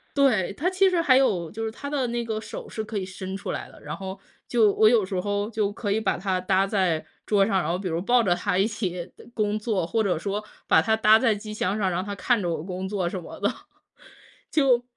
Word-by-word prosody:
对， 250 -11 +3
它 320 - 0
其 380 +1 +4
实 360 -2 +1
还 270 -6 +5
有 185 -11 +2
就 225 +1 -5
是 220 - -2
它 280 +5 -7
的 280 -4 0
那 235 0 -2
个 220 -1 -3
手 - - -8
是 220 - -4
可 215 0 -5
以 190 - -2
伸 190 0 -6
出 195 - -5
来 - - -5
的， - - -16
然 - - -5
后 190 0 -7 0.3
就 225 -4 +4
我 215 - +5
有 220 -4 +3
时 190 0 -4
候 205 +2 -1
就 215 -3 0
可 205 0 -3
以 220 - 0
把 220 - 0
它 185 0 -1
搭 190 +1 +2
在 185 -6 +1 0.2
桌 200 -2 +3
上， 195 -2 +1
然 160 - -2
后 175 - 0
比 190 - -4
如 165 0 -1
抱 240 +5 +4
着 180 -4 +2
它 180 0 -1
一 195 +3 +3
起 185 -5 -4 0.2
工 210 -2 0
作， 210 -5 -1
或 225 +3 +1
者 190 -5 +1
说 205 +4 -3 0.2
把 160 - +6
它 220 +5 +2
搭 220 0 +6
在 230 -3 +3
机 210 +1 -7
箱 205 -1 -1
上， 195 -3 +1
让 180 +1 -1
它 205 +1 -5
看 235 +2 +1
着 175 - -1
我 165 - -2
工 185 +1 -5
作 190 -3 -1
什 185 0 -5
么 - - -10
的， - - +2 1.2
就 245 -2 +4
205 Hz, 275 characters per minute, -25 LUFS, 185-225 Hz, 1.2 s, 把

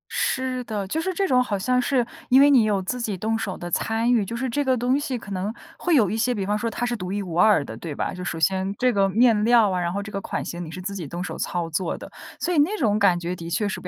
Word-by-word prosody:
是 260 -1 -1
的， 210 -3 -3
就 315 - -1
是 375 +3 -2
这 390 +2 0
种 255 -8 +3
好 215 -5 -1
像 250 +6 +1
是 250 -1 +1 0.2
因 260 +2 +6
为 285 +1 +6
你 255 -5 +6
有 205 -2 +1
自 250 +7 -3
己 220 -4 -2
动 225 +4 -1
手 195 -4 -4
的 175 0 -7
参 225 +5 +1
与， 230 -5 +3
就 230 - -5
是 255 +2 -2
这 290 +5 0
个 260 -1 +3
东 250 +4 +1
西 270 -3 -3
可 205 -3 -10
能 195 +3 -2 0.3
会 350 -2 +2
有 220 -9 +4
一 220 - -1
些 245 +2 +1
比 200 -3 -2
方 205 +2 0
说 230 +2 -2
它 240 +2 -3
是 240 0 -2
独 185 -1 -5
一 205 - -1
无 170 -3 -5
二 210 -6 +5
的， 115 -5 -8
对 150 +4 -6
吧？ - - -2
就 180 - -7
首 180 -3 -3
先 190 +4 0
这 255 0 +3
个 200 -3 +2
面 215 +1 +3
料 230 -4 +5
啊， 180 - 0
然 175 0 -1
后 200 +1 -2
这 215 - -9
个 195 - -3
款 - - -4
型 175 0 -5
你 - - -9
是 180 +3 -7
自 195 +2 -4
己 180 -6 -5
动 175 +5 -5
手 - - -5
操 175 -2 -2
作 165 +2 -2
的， - - -10 0.3
所 355 - 0
以 - - 0
那 330 +9 +3
种 215 - +1
感 190 -4 +4
觉 175 +1 -3
的 170 0 -7
确 205 +4 0
是 - - -4
不 - - -8
210 Hz, 335 characters per minute, -24 LUFS, 185-250 Hz, 0.3 s, 因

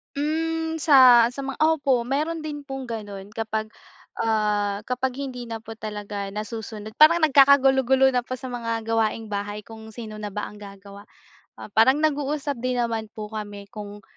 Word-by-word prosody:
Mm, 320 +2 -1
sa, 255 -6 +7
sa 260 +3 -6
mga 275 0 -6
opo, 290 -5 +3
meron 310 +5 -1
din 295 -2 -6
pong 270 -2 -6
gano'n 205 -4 -7
kapag, 220 -1 -2 0.5
ah, 210 -2 0
kapag 255 +1 -1
hindi 255 -3 -5
na 225 -1 -6
po 225 0 -10
talaga 205 -2 -6
nasusunod. 215 0 -7
Parang 320 +3 +7
nagkakagulo-gulo 270 -3 +5
na 245 - +1
po 255 0 -6
sa 260 - -7
mga 230 -2 -3
gawaing-bahay 215 -2 -1
kung 220 +1 -12
sino 220 -1 -8
na 210 -1 -6
ba 210 +1 -4
ang 210 - -12
gagawa. 200 0 -12 0.5
Ah, 210 - -11
parang 260 +8 +4
nag-uusap 290 -3 -1
din 255 +1 -1
naman 230 -2 -1
po 210 0 -7
kami 205 -1 -7
kung 205 -2 -9
230 Hz, 160 wpm, -24 LUFS, 210-275 Hz, 0.5 s, sa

